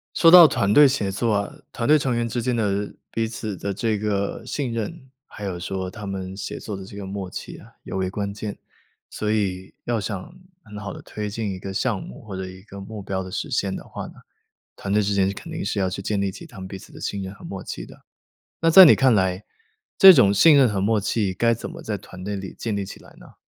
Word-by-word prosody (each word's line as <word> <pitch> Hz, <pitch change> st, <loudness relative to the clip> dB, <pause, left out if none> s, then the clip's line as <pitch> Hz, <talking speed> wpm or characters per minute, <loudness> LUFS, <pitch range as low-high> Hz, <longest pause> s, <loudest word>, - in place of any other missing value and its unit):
说 165 Hz, -, +6 dB
到 175 Hz, -2 st, +11 dB
团 100 Hz, -7 st, +1 dB
队 145 Hz, 0 st, +9 dB
协 130 Hz, -8 st, 0 dB
作 110 Hz, +4 st, 0 dB
啊， 100 Hz, -1 st, -1 dB, 0.2 s
团 115 Hz, -, -2 dB
队 155 Hz, +1 st, +7 dB
成 135 Hz, -3 st, 0 dB
员 115 Hz, 0 st, 0 dB
之 120 Hz, +1 st, -2 dB
间 125 Hz, +1 st, 0 dB
的 105 Hz, -3 st, -1 dB, 0.2 s
彼 115 Hz, 0 st, -1 dB
此 110 Hz, -3 st, -5 dB
的 100 Hz, +3 st, -3 dB
这 110 Hz, +2 st, -1 dB
个 100 Hz, -1 st, -2 dB
信 140 Hz, -4 st, -3 dB
任， 130 Hz, +6 st, -5 dB, 0.2 s
还 -, -, -12 dB
有 95 Hz, -3 st, -3 dB
说 95 Hz, +1 st, -4 dB
他 105 Hz, +2 st, -8 dB
们 95 Hz, -1 st, -5 dB
协 100 Hz, -, -6 dB
作 105 Hz, -, -5 dB
的 95 Hz, -, -8 dB
这 100 Hz, +1 st, -10 dB
个 100 Hz, -, -6 dB
默 95 Hz, -1 st, -5 dB
契 -, -, -7 dB
啊 -, -, -16 dB
尤 -, -, -5 dB
为 95 Hz, -1 st, -1 dB
关 100 Hz, 0 st, -3 dB
键。 105 Hz, 0 st, -6 dB, 0.5 s
所 105 Hz, -, -3 dB
以 95 Hz, -3 st, -2 dB
要 120 Hz, -1 st, 0 dB
想 100 Hz, -, -5 dB, 0.3 s
很 105 Hz, -2 st, -10 dB
好 105 Hz, -1 st, -6 dB
地 -, -, -10 dB
推 105 Hz, -1 st, -5 dB
进 110 Hz, 0 st, -3 dB
一 95 Hz, -, -6 dB
个 95 Hz, +1 st, -6 dB
项 105 Hz, +1 st, -1 dB
目， -, -, -10 dB
或 100 Hz, -3 st, -7 dB
者 95 Hz, -, -4 dB
一 95 Hz, 0 st, -11 dB
个 100 Hz, -1 st, -11 dB
目 105 Hz, +1 st, -8 dB
标 95 Hz, -1 st, -3 dB
的 95 Hz, -, -8 dB
实 -, -, -4 dB
现 95 Hz, -1 st, 0 dB
的 -, -, -7 dB
话 -, -, -7 dB
呢， -, -, -13 dB, 0.6 s
团 100 Hz, -, -4 dB
队 105 Hz, 0 st, +3 dB
之 100 Hz, 0 st, 0 dB
间 95 Hz, -1 st, +3 dB
是 100 Hz, -, -3 dB
肯 -, -, -9 dB
定 -, -, -4 dB
是 -, -, -2 dB
要 95 Hz, -1 st, +1 dB
去 95 Hz, +1 st, -5 dB
建 100 Hz, +1 st, -1 dB
立 100 Hz, -1 st, 0 dB
起 165 Hz, -, -10 dB
他 125 Hz, -10 st, -14 dB
们 95 Hz, 0 st, -7 dB
彼 95 Hz, -, -7 dB
此 -, -, -15 dB
的 -, -, -11 dB
信 100 Hz, -1 st, -3 dB
任 95 Hz, -, -6 dB
和 -, -, -15 dB
默 95 Hz, -1 st, -6 dB
契 -, -, -6 dB
的。 -, -, -16 dB, 0.6 s
那 165 Hz, -, +4 dB
在 185 Hz, +3 st, +11 dB
你 150 Hz, -, +8 dB
看 130 Hz, -3 st, +4 dB
来， 95 Hz, -1 st, +1 dB, 0.5 s
这 190 Hz, -1 st, +11 dB
种 100 Hz, -9 st, +5 dB
信 155 Hz, +9 st, +7 dB
任 135 Hz, -2 st, +6 dB
和 105 Hz, -3 st, -1 dB
默 105 Hz, +3 st, +2 dB
契 100 Hz, -1 st, 0 dB
该 115 Hz, +5 st, +2 dB
怎 115 Hz, -, -6 dB
么 -, -, -9 dB
在 105 Hz, -2 st, -3 dB
团 95 Hz, -1 st, -11 dB
队 100 Hz, +1 st, -3 dB
里 95 Hz, -1 st, -7 dB
建 115 Hz, -3 st, -2 dB
立 100 Hz, -1 st, -2 dB
起 -, -, -10 dB
来 -, -, -17 dB
呢？ -, -, -16 dB
100 Hz, 285 characters per minute, -23 LUFS, 95-115 Hz, 0.6 s, 到